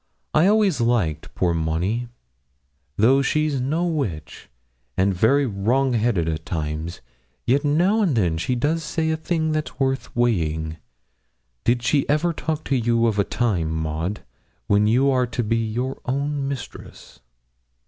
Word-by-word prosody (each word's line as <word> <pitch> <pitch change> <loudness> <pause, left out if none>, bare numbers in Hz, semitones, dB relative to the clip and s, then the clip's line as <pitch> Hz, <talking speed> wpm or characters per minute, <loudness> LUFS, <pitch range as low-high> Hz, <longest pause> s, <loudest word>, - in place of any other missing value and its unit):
I 160 +4 +5
always 205 - +3
liked 110 -11 0
poor 90 -2 +1
Monnie; 85 +7 0
and 120 - -8 0.9
though 130 +6 +5
she's 150 -1 0
no 155 +7 0
witch, 135 - -4 0.5
and 95 +1 +3
very 130 +10 +3
wrong 125 +5 +1
headed 110 -7 +1
at 80 -1 -2
times, 80 0 -4 0.4
yet 140 +4 +2
now 175 +9 +2
and 175 -10 +2
then 85 -7 +1
she 125 +9 -1
does 155 +6 0
say 160 +1 -1
a - - +1
thing 160 0 -1
that's 155 -4 -3
worth 135 -1 -1
weighing. 80 -9 0 0.9
Did 120 0 +2
she 140 +4 +1
ever 155 +4 +2
talk 155 -1 -3
to 140 - 0
you 115 -1 +2
of 110 -3 +1
a - - +4
time, 100 -7 -1
Maud, 80 +4 -3 0.4
when 105 +1 +3
you 130 +5 +3
are 125 -1 +2
to 120 +1 -2
be 115 +1 0
your 115 +4 -3
own 140 +2 -1
mistress?' 135 -4 -8
120 Hz, 155 wpm, -23 LUFS, 95-145 Hz, 0.9 s, I